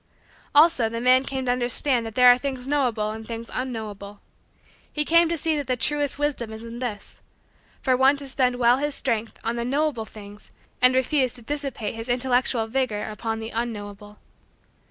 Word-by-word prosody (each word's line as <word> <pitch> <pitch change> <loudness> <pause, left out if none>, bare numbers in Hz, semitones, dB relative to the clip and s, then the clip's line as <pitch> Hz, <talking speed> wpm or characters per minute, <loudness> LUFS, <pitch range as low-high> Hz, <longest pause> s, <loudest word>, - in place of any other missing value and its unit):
Also 290 -7 +5
the 230 +1 -4
man 255 +2 +4
came 265 -1 -4
to 245 - +2
understand 245 0 +1
that 220 - -9
there 250 -1 +6
are 245 - +7
things 260 -2 -4
knowable 245 -7 0
and 220 0 -8
things 230 0 -6
unknowable. 210 -5 -5 0.7
He 300 0 0
came 335 +1 +4
to 335 - -1
see 310 -1 0
that 255 -3 -2
truest 290 +1 0
wisdom 285 -6 -2
is 220 +1 -8
in 230 +1 -8
this: 225 -5 -6 0.6
for 260 -2 +3
one 265 +2 +4
to 280 -1 -7
spend 255 -2 +1
well 245 0 +4
his 290 0 -1
strength 230 -4 -2
on 235 +1 -2
the 235 - -2
knowable 270 -2 -1
things 205 -1 -13 0.3
and 250 0 +6
refuse 260 -1 +1
to 240 - -8
dissipate 275 -4 -4
his 225 +2 -7
intellectual 245 -1 +1
vigor 225 -3 -1
upon 225 +1 -4
the 225 0 -6
unknowable. 210 -3 -5
245 Hz, 180 wpm, -24 LUFS, 225-270 Hz, 0.7 s, are